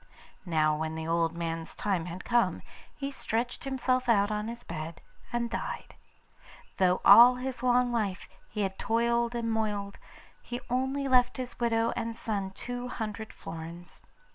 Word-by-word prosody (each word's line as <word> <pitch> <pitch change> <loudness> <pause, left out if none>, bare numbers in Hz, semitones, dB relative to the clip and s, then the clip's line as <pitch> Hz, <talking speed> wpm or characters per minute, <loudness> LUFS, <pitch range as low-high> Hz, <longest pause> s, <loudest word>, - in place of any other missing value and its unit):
Now 155 -2 +3
when 160 0 -3
the 160 0 -4
old 165 0 +1
man's 165 -1 -4
time 185 -5 -1
had 180 +2 -7
come, 240 -1 +2 0.3
he 280 -1 -3
stretched 240 -2 -2
himself 255 -1 0
out 205 -2 +4
on 210 0 -2
his 235 +1 -7
bed 160 0 -6 0.3
and 240 0 0
died. 230 - -5 0.8
Though 185 -1 +3
all 245 +2 +10
his 250 -1 -4
life 250 0 +4
long 205 -5 0 0.3
he 210 - -3
had 190 -1 -2
toiled 235 +1 +1
and 230 -1 -1
moiled, 210 -2 -2 0.4
he 245 0 -5
only 265 +2 0
left 250 -1 +4
his 255 -1 -6
widow 230 -1 +2
and 230 0 -3
son 200 -4 -2
two 245 +5 -5
hundred 220 -2 -5
florins. 165 +2 -9
225 Hz, 155 wpm, -29 LUFS, 185-245 Hz, 0.8 s, all